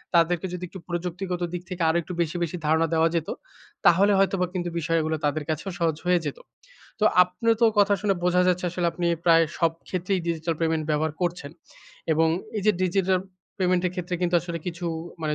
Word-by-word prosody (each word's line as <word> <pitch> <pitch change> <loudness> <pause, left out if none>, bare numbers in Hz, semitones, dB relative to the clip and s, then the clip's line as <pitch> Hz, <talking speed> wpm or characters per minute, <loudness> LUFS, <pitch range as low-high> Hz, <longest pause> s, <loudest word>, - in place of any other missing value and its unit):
তাদেরকে 170 +1 +3
যদি 180 - -5
একটু 190 - -9
প্রযুক্তিগত 180 +1 -3
দিক 175 - -3
থেকে 180 -2 -5
আরো 165 - +2
একটু 180 - -7
বেশি, 165 +1 -2
বেশি 170 +2 -3
ধারণা 160 +1 +3
দেওয়া 165 0 +4
যেত 165 -1 -1 0.6
তাহলে 195 +4 +6
হয়তোবা 195 -1 +2
কিন্তু 175 -1 -2
বিষয়গুলো 160 -1 0
তাদের 150 +1 0
কাছেও 160 +5 -2
সহজ 165 -2 +1
হয়ে 180 -1 +3
যেত। - - -4 0.6
তো - - +3 0.2
আপনি 180 +6 -3
তো - - +5
কথা 205 0 +5
শুনে 205 -2 +1
বোঝা 180 0 +3
যাচ্ছে 180 0 +1
আসলে 175 0 -1
আপনি 175 - -2 0.2
প্রায় 165 -1 +6
সবক্ষেত্রেই 180 +3 -1
ডিজিটাল 165 0 -1
পেমেন্ট 160 -1 +1
ব্যবহার 155 +1 0
করছেন 170 -5 -2 0.6
এবং 160 +1 +3 0.3
এই 210 - -2
যে 210 - +6
ডিজিটাল 185 0 +2 0.4
পেমেন্ট 185 -1 +2
এর 180 - -2
ক্ষেত্রে 180 0 -3
কিন্তু 175 0 +1
আসলে 170 0 -5
কিছু 175 0 -4 0.4
মানে 150 -1 0
175 Hz, 190 wpm, -25 LUFS, 165-180 Hz, 0.6 s, তাহলে